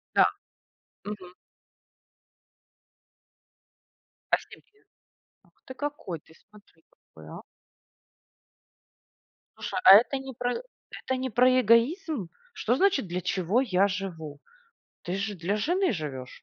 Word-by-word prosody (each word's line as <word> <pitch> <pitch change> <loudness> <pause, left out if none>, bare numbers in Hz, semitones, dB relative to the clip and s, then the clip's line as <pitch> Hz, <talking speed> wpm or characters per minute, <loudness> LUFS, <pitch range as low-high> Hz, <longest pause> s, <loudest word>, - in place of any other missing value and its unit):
Да. - - +7 0.8
Мгм. 185 -4 -8 3.0
А - - +7
в - - -13
семье? 425 0 -18 0.6
Ах - - -29
ты 260 - -8
какой. 290 - -5
Ты 160 - -22
смотри, 205 -6 -22
какой, 80 -1 -17
а. - - -9 2.2
Слушай, - - -4
а 190 - +11
это 245 +5 +4
не 265 0 -8
про 245 +1 -2
это 485 - -7
не 260 0 -3
про 255 +2 +4
эгоизм? 240 - +2 0.2
Что 240 - 0
значит 385 - +2
для 180 +1 -3
чего 185 +5 +1
я 200 -6 +2
живу? 170 -7 -6 0.6
Ты 175 - -4
же 200 +2 -3
для 185 +4 -2
жены 355 - +1
живешь, 135 -7 -6
210 Hz, 115 wpm, -27 LUFS, 180-260 Hz, 3.0 s, а